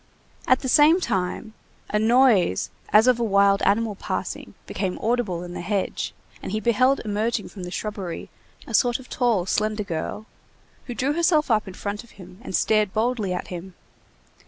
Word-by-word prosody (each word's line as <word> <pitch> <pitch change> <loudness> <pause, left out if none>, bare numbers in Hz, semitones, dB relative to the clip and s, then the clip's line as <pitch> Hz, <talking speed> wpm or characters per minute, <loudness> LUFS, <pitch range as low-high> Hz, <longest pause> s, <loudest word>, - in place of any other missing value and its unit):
At 255 - +4
the 265 - -3
same 300 +7 +6
time, 195 - -2 0.4
a 210 - +2
noise 225 - +3 0.2
as 215 +2 +6
of 250 -2 +4
a - - +1
wild 200 -2 +3
animal 220 +1 +2
passing 200 - -5
became 185 -2 -3
audible 215 -7 -1
in 175 0 -8
the - - -5
hedge, 195 +2 -2 0.3
and - - -6
he 215 - -1
beheld 255 +5 +2
emerging 215 +1 -1
from 195 - -10
the 180 - -5
shrubbery 195 -3 -5 0.3
a - - -9
sort 240 -2 +3
of 260 - -14
tall, 230 -8 +1
slender 215 +2 0
girl, 175 +4 -4 0.6
who 245 - -5
drew 265 +6 0
herself 315 -4 +2
up 215 -2 +2
in 190 - -8
front 205 +2 -5
of 235 - -20
him 185 0 -13
and 215 - -4
stared 215 -3 +2
boldly 220 -3 0
at 180 - -4
him. 180 +1 -8
215 Hz, 180 wpm, -24 LUFS, 190-245 Hz, 0.6 s, same